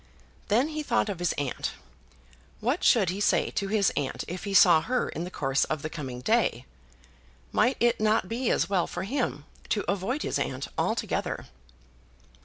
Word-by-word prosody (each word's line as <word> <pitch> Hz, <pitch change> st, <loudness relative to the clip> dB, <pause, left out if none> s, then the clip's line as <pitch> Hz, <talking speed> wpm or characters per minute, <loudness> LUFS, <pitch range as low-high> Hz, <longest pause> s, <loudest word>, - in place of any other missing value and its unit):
Then 240 Hz, +9 st, +2 dB
he 310 Hz, -1 st, -3 dB
thought 240 Hz, -6 st, +1 dB
of 190 Hz, -4 st, -4 dB
his 175 Hz, -2 st, +1 dB
aunt. 140 Hz, -3 st, -3 dB, 0.9 s
What 250 Hz, +10 st, -1 dB
should 200 Hz, -8 st, +4 dB
he 195 Hz, +2 st, -4 dB
say -, -, +2 dB
to 200 Hz, -, -2 dB
his 205 Hz, -1 st, +2 dB
aunt 140 Hz, -2 st, -2 dB
if 180 Hz, +4 st, -6 dB
he 200 Hz, -, -3 dB
saw 170 Hz, -4 st, +7 dB
her 250 Hz, +8 st, 0 dB
in 165 Hz, -, -4 dB
the -, -, -6 dB
course 135 Hz, -5 st, 0 dB
of 155 Hz, -2 st, -3 dB
the 155 Hz, -, -4 dB
coming 130 Hz, -6 st, -6 dB
day? 210 Hz, -, +1 dB, 0.9 s
Might 250 Hz, +2 st, +2 dB
it 240 Hz, 0 st, +3 dB
not 215 Hz, -3 st, +2 dB
be 235 Hz, +4 st, -1 dB
as -, -, +2 dB
well 190 Hz, -3 st, +1 dB
for 175 Hz, -, -5 dB
him 220 Hz, -, -2 dB, 0.2 s
to 205 Hz, -, 0 dB
avoid 205 Hz, +9 st, -1 dB
his -, -, -1 dB
aunt 130 Hz, +1 st, -3 dB
altogether? -, -, -1 dB
200 Hz, 180 wpm, -27 LUFS, 155-235 Hz, 0.9 s, saw